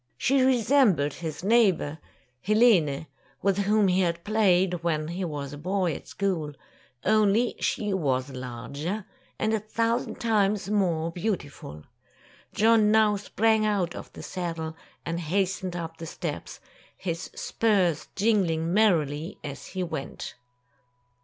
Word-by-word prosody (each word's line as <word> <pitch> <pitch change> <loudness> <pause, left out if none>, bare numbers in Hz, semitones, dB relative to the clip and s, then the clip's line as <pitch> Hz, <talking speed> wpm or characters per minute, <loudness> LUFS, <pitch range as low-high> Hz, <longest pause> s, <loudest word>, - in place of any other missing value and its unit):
She 270 +1 +2
resembled 240 - +3
his 160 -1 -6
neighbor, 190 -8 +3 0.4
Helene, 195 - +3 0.4
with 195 0 +2
whom 205 +1 +3
he 185 +1 +3
had 170 -1 -1
played, 190 -5 +2
when 155 -2 -1
he 180 +3 -3
was 145 -4 -4
a 145 - -8
boy 180 0 0
at - - -9
school; 175 -7 -2 0.5
only 215 +2 +3
she 210 -2 -1
was 135 -7 0
larger, 140 - -5 0.3
and 220 - 0
a 220 - +2
thousand 230 +3 -1
times 210 -3 +1
more 170 -5 +1
beautiful. 165 - -4 0.7
John 220 -1 +4
now 215 -1 +4
sprang 220 +2 +1
out 200 -5 0
of - - -9
the - - -9
saddle, 165 -3 -4 0.3
and 170 0 -2
hastened 185 +2 -1
up 165 -1 -5
the 165 - -7
steps, - - -5 0.4
his 170 -2 -4
spurs 190 -8 +1
jingling 180 -6 +1
merrily 165 -7 +2
as 140 -2 -7
he 185 -1 -3
went. 165 -5 -5
185 Hz, 130 wpm, -27 LUFS, 160-215 Hz, 0.7 s, John